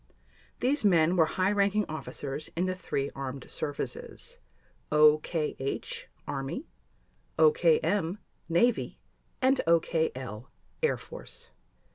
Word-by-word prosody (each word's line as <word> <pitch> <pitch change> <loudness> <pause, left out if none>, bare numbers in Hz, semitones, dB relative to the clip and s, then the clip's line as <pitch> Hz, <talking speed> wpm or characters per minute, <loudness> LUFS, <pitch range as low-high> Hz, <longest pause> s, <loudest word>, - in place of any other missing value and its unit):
These 275 +2 +3
men 175 -3 +4
were 165 -3 +5
high 185 +4 +1
ranking 205 0 +2
officers 150 -1 -5
in 175 +2 +1
the 185 - 0
three 140 -6 -2
armed 135 -1 -6
services: 475 - -5 0.5
OKH—Army, 150 - 0 0.7
OKM—Navy, 235 - +2 0.4
and 265 +1 +4
OKL—Air 160 - 0
Force. 480 0 -9
170 Hz, 80 wpm, -29 LUFS, 150-245 Hz, 0.7 s, were